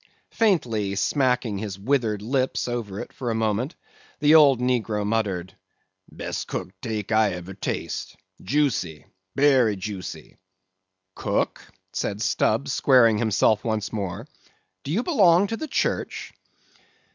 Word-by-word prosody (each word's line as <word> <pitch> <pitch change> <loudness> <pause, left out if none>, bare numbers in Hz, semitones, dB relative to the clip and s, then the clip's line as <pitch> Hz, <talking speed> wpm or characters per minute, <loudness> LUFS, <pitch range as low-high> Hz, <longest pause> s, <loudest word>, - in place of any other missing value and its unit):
Faintly 115 - +1
smacking 125 -2 +1
his 100 -3 -5
withered 110 -2 0
lips 130 +3 0
over 115 -5 -4
it - - -9
for 125 -3 -4
a 115 - 0
moment, 110 - -1 0.4
the 150 +1 +5
old 145 -5 +7
negro 115 -4 0
muttered, 100 -4 -1 0.6
"Best - - -5
cooked 95 0 -6
'teak 110 -1 -4
I 110 -3 +3
eber 90 +2 -7
taste; 95 - -4 0.3
joosy, 100 - -1 0.3
berry 130 -7 +4
joosy." 95 -1 -7 0.8
"Cook," - - -2 0.3
said - - -2
Stubb, 70 - +1
squaring 115 - +4
himself 110 -1 +2
once 110 -2 -2
more; 100 -4 -4 0.6
"do 140 - -5
you 215 +9 +1
belong 195 - +4
to 225 - -3
the 315 - -5
church?" - - -2
110 Hz, 125 wpm, -24 LUFS, 100-135 Hz, 0.8 s, old